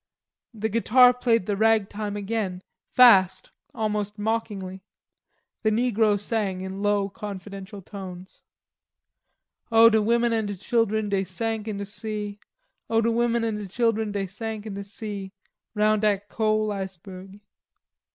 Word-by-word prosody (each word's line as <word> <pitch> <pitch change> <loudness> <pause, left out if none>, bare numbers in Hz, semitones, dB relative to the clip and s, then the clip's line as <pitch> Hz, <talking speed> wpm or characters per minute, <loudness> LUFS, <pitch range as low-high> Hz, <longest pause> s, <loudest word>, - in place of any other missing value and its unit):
The 220 0 -1
guitar 245 +3 +5
played 235 -5 +1
the 205 - -1
rag 220 -1 +3
time 205 0 -4
again, 200 -3 -3 0.3
fast, 195 -7 +5 0.2
almost 210 -1 -2
mockingly. 205 -3 -3 0.8
The 215 - +2
negro 220 -2 +2
sang 205 -3 -2
in 190 0 -5
low 205 -1 +1
confidential 200 -1 -8
tones. 185 -1 -9 1.3
"O 225 0 +7
de 220 0 +3
women 235 +2 +2
an' 220 -2 0
de 205 - -4
chilen 220 +1 0
dey 195 -1 +1
sank 220 +3 -3
in 210 -2 -3
de 200 - -4
sea. 210 0 -5 0.5
O 225 - +3
de 230 +1 +2
women 235 0 +1
an' 220 -2 -1
de 210 -1 -6
chilen 220 +1 0
dey 200 -1 -2
sank 215 +2 -6
in 215 - -5
de 200 0 -5
sea, 200 -1 -7 0.4
Roun' 215 0 +3
dat 205 -1 0
cole 215 -1 +1
iceberg." 190 0 -7
210 Hz, 140 wpm, -25 LUFS, 195-225 Hz, 1.3 s, O